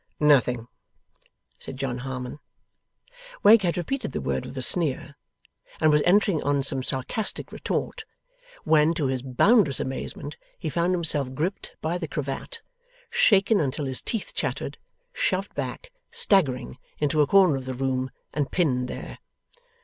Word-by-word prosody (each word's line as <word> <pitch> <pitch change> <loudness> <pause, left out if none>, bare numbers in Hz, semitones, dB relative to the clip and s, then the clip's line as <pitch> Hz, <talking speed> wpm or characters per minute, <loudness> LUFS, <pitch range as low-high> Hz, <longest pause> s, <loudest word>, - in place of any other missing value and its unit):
'Nothing,' 125 -6 +3 0.9
said 130 - -8
John 130 -2 -3
Harmon. 130 +1 -6 1.0
Wegg 215 +1 +8
had 175 -2 0
repeated 180 - -3
the - - -2
word 65 -1 -2
with 135 - -9
a - - -2
sneer, 145 -3 +1 0.7
and 155 - +4
was 150 0 +4
entering 195 -3 +3
on 140 -1 0
some 135 -1 +1
sarcastic 130 - -1
retort, 450 - -3 0.6
when, 160 +1 +3
to 155 -4 -1
his 130 -1 -1
boundless 140 - +3
amazement, 135 +2 -5 0.2
he 155 - -4
found 170 +5 +1
himself 145 -6 +3
gripped 175 +8 -3
by 170 +3 -2
the 165 - -4
cravat; 150 - -5 0.5
shaken 220 - +4
until 140 +1 -2
his 130 -1 -1
teeth 225 -4 -2
chattered; - - -3 0.3
shoved - - -1
back, - - -5 0.2
staggering, 135 - +1 0.2
into 150 +1 +1
a 145 - +3
corner 190 -5 +5
of 135 -1 -5
the 130 -1 -4
room; 130 0 -1 0.2
and 145 -1 -1
pinned 130 -8 +1
there. - - -8
150 Hz, 145 wpm, -25 LUFS, 130-180 Hz, 1.0 s, Wegg